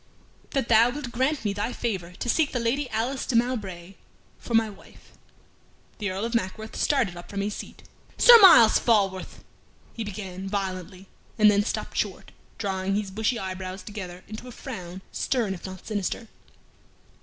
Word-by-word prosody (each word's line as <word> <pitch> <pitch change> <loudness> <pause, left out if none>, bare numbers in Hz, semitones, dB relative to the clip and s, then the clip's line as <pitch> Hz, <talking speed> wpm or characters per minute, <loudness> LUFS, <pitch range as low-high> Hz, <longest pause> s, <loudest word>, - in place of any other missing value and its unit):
"That 270 -5 0
thou 230 +1 +6
wilt 265 -1 -5
grant 260 +2 0
me 205 - +1
thy 205 +4 -2
favor 190 -7 -3
to 210 - -6
seek 300 +5 +2
the 250 - 0
Lady 250 +4 0
Alice 235 +5 -2
de 250 - -2
Mowbray 200 -7 -1 0.5
for 235 - -3
my 225 0 +4
wife." 205 -2 -15 0.9
The 205 -2 -1
Earl 190 +4 -3
of 235 - -4
Mackworth 220 0 -3
started 245 -11 +1
up 175 - -10
from 200 -1 -3
his 205 +1 -2
seat. - - -9 0.3
"Sir 475 -1 +9
Myles 235 - +8
Falworth" 195 -5 0 0.5
he 230 - -4
began, 195 -2 -6
violently, 190 -1 -4 0.3
and 210 -1 +7
then 205 0 +3
stopped - - -4
short, - - -3 0.3
drawing 195 -1 -1
his 205 -2 -2
bushy 220 +4 0
eyebrows 185 -1 -5
together 185 -4 -8
into 215 +4 -8
a - - -8
frown 185 -4 -8
stern, 230 -7 -1
if 190 - -8
not 185 -1 -10
sinister. 215 +2 -3
210 Hz, 165 wpm, -26 LUFS, 190-235 Hz, 0.9 s, Sir